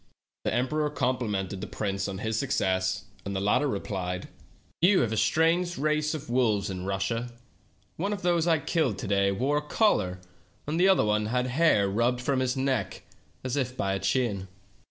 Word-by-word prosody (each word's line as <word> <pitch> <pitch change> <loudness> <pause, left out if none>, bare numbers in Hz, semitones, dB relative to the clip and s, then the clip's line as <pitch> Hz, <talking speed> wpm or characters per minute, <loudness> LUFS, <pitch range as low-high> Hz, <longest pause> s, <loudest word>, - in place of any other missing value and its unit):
The - - 0
emperor 150 +5 0
complimented 110 -9 -2
the - - -4
prince 100 -2 -2
on 95 -1 -4
his 110 +2 -2
suc 140 - -3
cess, 95 -3 0 0.2
and 100 0 -4
the - - 0
latter 105 +9 +2
replied: 95 -5 -3 0.5
"You 185 +3 +5
have 115 - 0
a - - 0
strange 170 +8 +2
race 150 +1 0
of 155 0 -7
wolves 110 -6 +1
in 90 -1 -5
Russia. 105 +5 -2 0.7
One 195 +5 -1
of 205 -3 -4
those 175 -1 +2
I 165 -2 +4
killed 145 - 0
to - - -5
day 100 0 +2
wore 130 +9 0
a - - 0
collar, 150 - +1 0.5
and 155 +3 -2
the 185 - +5
other 190 - +4 0.2
had 125 +1 +1
the - - -3
hair 130 -7 +3
rubbed 120 +5 +1
from 130 +1 0
his 130 0 0
neck 130 -6 -1 0.4
as 130 0 -2
if 130 -2 -2
by 95 0 0
a 95 - -1
chain." 100 -1 0
125 Hz, 190 wpm, -27 LUFS, 100-150 Hz, 0.7 s, You